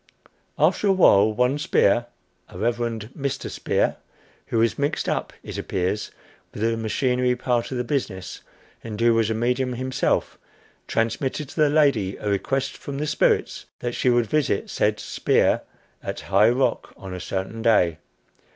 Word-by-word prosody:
After 210 - +2
a - - +5
while, 110 - +5
one 125 +6 +1
Spear 120 - +2 0.4
a 95 - -11
"Reverend 115 +1 -2
Mr. 140 -2 -3
Spear" - - 0 0.5
who - - -1
was 115 +3 +2
mixed 145 +2 -1
up, - - -1
it - - -6
appears, 95 +3 -2 0.4
with 105 - -5
the 115 0 +2
machinery 125 +3 0
part 120 -1 -1
of 130 - -2
the 125 - 0
business, 115 -8 -3 0.4
and 110 -2 -6
who 115 0 +4
was 115 -1 +2
a 110 - 0
medium 125 +3 0
himself, 130 +1 -1 0.5
transmitted 130 +5 -1
to - - -12
the 150 -2 +4
lady 140 -11 +2
a - - -6
request 115 +7 -1
from 140 -1 -6
the 150 - -2
spirits 150 - +1
that 120 0 -4
she 125 - +1
would 120 -1 +3
visit 140 -5 0
said 105 0 +1
Spear - - +1 0.4
at - - -5
High 100 +3 +4
Rock 125 0 0
on 95 -1 -8
a 90 - -5
certain 95 +5 -4
day. 90 -8 +3
120 Hz, 160 wpm, -24 LUFS, 105-130 Hz, 0.5 s, a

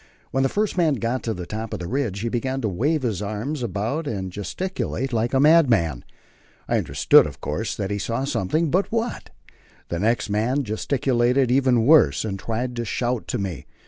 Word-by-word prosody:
When 135 - +1
the 135 - +2
first 210 +2 -1
man 160 -4 +3
got 120 +2 -2
to 115 - -2
the 90 -1 -6
top 110 +3 -5
of - - -6
the 90 - -5
ridge, 115 -6 -2
he 115 - -1
began 130 +3 -2
to 110 - 0
wave 140 - 0
his 110 -6 -1
arms 110 +8 -3
about 120 - -2
and 95 -6 -3
gesticulate 135 - -3
like 115 +1 0
a 135 - +2
madman. 125 - +4 0.6
I - - +2
understood, - - +4
of - - -10
course, 105 +9 -3
that 100 -1 -3
he 100 - -1
saw 115 +5 -2
something, 145 - 0
but 190 +3 +1
what? 230 +1 -2 0.6
The 85 - -2
next 115 +3 +1
man 115 +7 0
gesticulated 125 +2 +1
even 125 -3 +3
worse, 125 - +5
and 95 -2 -4
tried 120 +3 -3
to 120 - -1
shout 120 +1 -2
to - - -2
me. 95 -7 -5
120 Hz, 195 wpm, -23 LUFS, 105-135 Hz, 0.6 s, worse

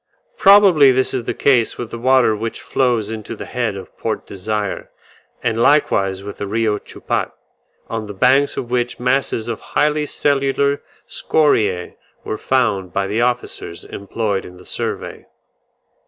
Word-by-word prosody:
Probably 195 -9 +7
this 130 0 +1
is 125 -3 -2
the - - -2
case 125 -5 +2
with 120 - -6
the 115 - -6
water 130 -2 +4
which 115 +2 -4
flows 120 -5 0
into 110 +1 -6
the - - -7
head 120 -5 -2
of 95 - -10
Port - - -3
Desire, 105 +1 -4 0.5
and 115 0 0
likewise 100 -10 +2
with 100 0 -8
the 100 - -3
Rio 105 0 0
Chupat, - - -3 0.6
on 115 -2 -4
the 105 - -8
banks 130 +6 +3
of 120 - -4
which 120 -1 -1
masses 125 -2 0
of 115 -2 -4
highly 150 0 0
cellular 140 0 +1 0.3
scoriae 105 - +1 0.3
were 110 - -4
found 105 -8 0
by 100 +1 -1
the 105 +4 -1
officers 120 -8 -2
employed 100 0 -3
in 90 - -12
the 90 - -15
survey. - - -5
115 Hz, 155 wpm, -19 LUFS, 105-130 Hz, 0.6 s, Probably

